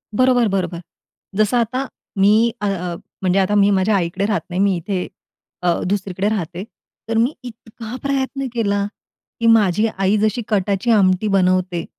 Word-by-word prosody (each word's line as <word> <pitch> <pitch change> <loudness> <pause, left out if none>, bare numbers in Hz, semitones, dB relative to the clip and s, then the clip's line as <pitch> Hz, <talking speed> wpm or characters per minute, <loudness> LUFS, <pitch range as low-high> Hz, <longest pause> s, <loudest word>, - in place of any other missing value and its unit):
बरोबर, 250 -1 +3
बरोबर. 185 -3 -2 0.5
जसं 215 +3 +2
आता 255 +3 -1 0.3
मी 215 +4 +4
अ, - - -1
अ, 180 -3 -2 0.3
म्हणजे 185 +1 +2
आता 195 +2 +1
मी 200 0 +5
माझ्या 195 +2 +2
आईकडे 180 +2 -1
राहत 210 0 0
नाही, 180 +1 -3
मी 200 -2 +3
इथे 180 +2 -3 0.5
अ, 175 -1 +2
दुसरीकडे 195 0 -1
राहते. 180 -4 -3 0.5
तर 225 - 0
मी 245 +6 +2
इतका 225 0 -9
प्रयत्न 275 -1 -1
केला 205 -4 0 0.5
की 230 - -1
माझी 215 -1 +4
आई 195 +2 +2
जशी 215 +3 0
कटाची 200 +1 0
आमटी 195 -1 +3
बनवते, 185 -3 +1
200 Hz, 155 wpm, -19 LUFS, 185-225 Hz, 0.5 s, मी